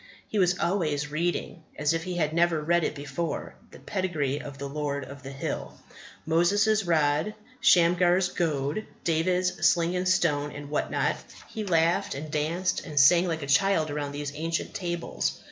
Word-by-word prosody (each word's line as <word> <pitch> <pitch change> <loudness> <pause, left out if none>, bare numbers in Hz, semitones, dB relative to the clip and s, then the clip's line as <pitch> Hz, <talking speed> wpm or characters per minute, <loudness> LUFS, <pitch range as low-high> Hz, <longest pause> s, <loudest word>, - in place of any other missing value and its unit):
He 215 - -1
was 180 -1 +3
always 150 -5 -1
reading, 170 +2 -2 0.2
as 150 +1 +1
if 165 +1 -2
he 180 -1 -4
had 155 -3 0
never 170 -1 +2
read 170 +3 +1
it - - -1
before, 145 +3 -4 0.2
the - - -13
pedigree 155 -8 -2
of 140 -1 -9
the 140 0 -5
Lord 140 -1 -3
of 140 +1 -11
the 135 - -8
Hill. 135 0 -5 0.5
Moses' 200 +7 +3
rod, 155 +3 +1 0.2
Shamgar's 180 +1 +4
goad, 155 +2 -1 0.2
David's 180 +3 0
sling 170 +1 +3
and 180 0 0
stone, 150 -5 +1
and 145 0 -8
what 150 - -1
not 145 0 0 0.3
he 220 -1 -5
laughed 170 -5 +1
and 150 +2 -6
danced 165 +5 -1
and 150 -4 -1
sang 170 +6 +6
like 160 -3 -2
a - - -3
child 155 +2 +2
around 145 -1 -3
these 145 0 -4
ancient 160 +2 -3
tables. 175 -2 -3
165 Hz, 170 wpm, -27 LUFS, 145-175 Hz, 0.5 s, sang